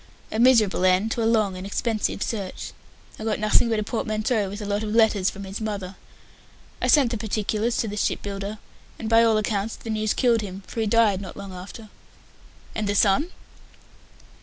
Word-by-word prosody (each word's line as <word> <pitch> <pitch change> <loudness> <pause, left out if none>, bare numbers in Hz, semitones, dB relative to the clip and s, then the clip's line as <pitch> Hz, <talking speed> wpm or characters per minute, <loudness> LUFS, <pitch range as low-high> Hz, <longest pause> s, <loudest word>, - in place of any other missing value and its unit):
A 220 - -2
miserable 230 -7 +4
end 185 +4 +3
to 230 - -1
a 225 - +2
long 215 -4 +2
and 185 - -7
expensive 215 0 -1
search. 200 -5 -5 0.5
I - - -6
got 220 -1 0
nothing 215 +2 +3
but 225 - +1
a 215 - 0
portmanteau 215 -1 -1
with 205 +2 -6
a 210 - -5
lot 205 +1 -1
of 215 0 -3
letters 215 -4 +4
from 200 - -8
his 195 +3 -6
mother. 200 -3 -4 0.9
I - - +1
sent 275 -6 +5
the 230 - -2
particulars 215 +2 -1
to 225 - 0
the 210 0 -5
ship - - -1
builder, 200 +1 -5 0.4
and 225 - -5
by 230 +1 +5
all 225 -1 +4
accounts 215 0 -1
the 225 - -7
news 215 0 0
killed 235 -3 +3
him, 195 -1 -7
for - - -7
he 220 - 0
died 210 -3 +3
not 195 - -8
long 200 -1 -8
after." 200 +4 -10 0.8
"And 215 -2 -2
the 205 - 0
son?" 210 - +3
215 Hz, 200 wpm, -24 LUFS, 200-225 Hz, 0.9 s, sent